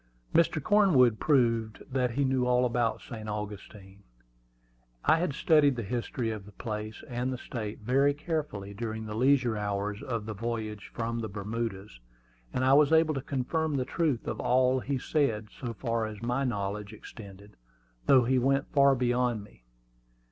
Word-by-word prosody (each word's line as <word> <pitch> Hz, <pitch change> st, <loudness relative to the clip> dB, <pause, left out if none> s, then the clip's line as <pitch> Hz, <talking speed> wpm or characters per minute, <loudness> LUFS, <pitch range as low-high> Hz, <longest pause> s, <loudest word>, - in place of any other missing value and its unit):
Mr. 165 Hz, -1 st, +3 dB
Cornwood 150 Hz, -, +4 dB
proved 115 Hz, -6 st, +1 dB
that 130 Hz, -1 st, +1 dB
he 135 Hz, +4 st, 0 dB
knew 130 Hz, -1 st, +1 dB
all 125 Hz, 0 st, +3 dB
about 115 Hz, -2 st, 0 dB
St. 110 Hz, -2 st, -7 dB
Augustine. 105 Hz, -1 st, -7 dB, 1.0 s
I 160 Hz, -, +5 dB
had 170 Hz, -4 st, -1 dB
studied 150 Hz, -4 st, +4 dB
the 120 Hz, -, -3 dB
history 115 Hz, +2 st, -2 dB
of 105 Hz, -2 st, -7 dB
the 105 Hz, -, -13 dB
place 110 Hz, +1 st, -6 dB
and 125 Hz, +1 st, -2 dB
the 130 Hz, -, -3 dB
state 110 Hz, -4 st, -6 dB
very 135 Hz, +5 st, +2 dB
carefully 145 Hz, -, -4 dB
during 110 Hz, +1 st, -4 dB
the 105 Hz, -, -5 dB
leisure 125 Hz, 0 st, +3 dB
hours 105 Hz, 0 st, -2 dB
of 115 Hz, -6 st, -3 dB
the 110 Hz, -, -4 dB
voyage 110 Hz, -1 st, -4 dB
from 115 Hz, 0 st, -3 dB
the 110 Hz, -1 st, -4 dB
Bermudas, 105 Hz, -, -5 dB, 0.5 s
and 130 Hz, -, 0 dB
I 135 Hz, -, +5 dB
was 145 Hz, +1 st, +5 dB
able 160 Hz, -1 st, +4 dB
to 135 Hz, -, -3 dB
confirm 145 Hz, +4 st, -1 dB
the 130 Hz, -, -1 dB
truth 150 Hz, -7 st, -1 dB
of -, -, -3 dB
all 130 Hz, +1 st, +3 dB
he 135 Hz, +2 st, -2 dB
said, 115 Hz, -7 st, 0 dB
so 120 Hz, -3 st, -6 dB
far 115 Hz, -1 st, -2 dB
as 105 Hz, -1 st, -8 dB
my 125 Hz, +3 st, 0 dB
knowledge 105 Hz, -2 st, -3 dB
extended, 100 Hz, -2 st, -12 dB, 0.5 s
though 130 Hz, -2 st, +6 dB
he 130 Hz, +2 st, +2 dB
went 135 Hz, +2 st, +1 dB
far 140 Hz, -1 st, +5 dB
beyond 120 Hz, -3 st, 0 dB
me. -, -, -19 dB
120 Hz, 170 wpm, -29 LUFS, 105-135 Hz, 1.0 s, though